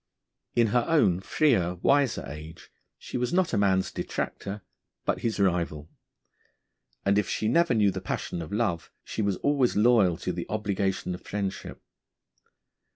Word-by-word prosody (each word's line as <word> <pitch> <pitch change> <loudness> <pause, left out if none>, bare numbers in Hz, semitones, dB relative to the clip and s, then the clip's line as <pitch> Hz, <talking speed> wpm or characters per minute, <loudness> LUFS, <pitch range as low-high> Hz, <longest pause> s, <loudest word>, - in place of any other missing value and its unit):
In 115 -1 +4
her 120 -1 +3
own 120 - +3
freer, 95 - +2
wiser 140 +7 +2
age, 75 +3 -10 0.3
she - - -6
was 125 - -1
not 180 0 +1
man's 95 -2 +2
detractor, 100 0 -4 0.4
but - - 0
his 115 -3 -2
rival; 85 -5 0 1.1
and 100 +1 +4
if 105 - -2
she 110 - -1
never 165 +3 +3
knew 105 -3 +4
the 95 0 -5
passion 90 -2 -3
of 80 - -7
love, 100 -6 -1
she - - -4
was 100 -2 +1
always 140 -4 +2
loyal 105 -6 +4
to 90 +1 -3
the 85 0 -5
obligation 100 -3 -1
of 90 - -7
friendship. 100 -2 -5
100 Hz, 150 wpm, -27 LUFS, 90-120 Hz, 1.1 s, In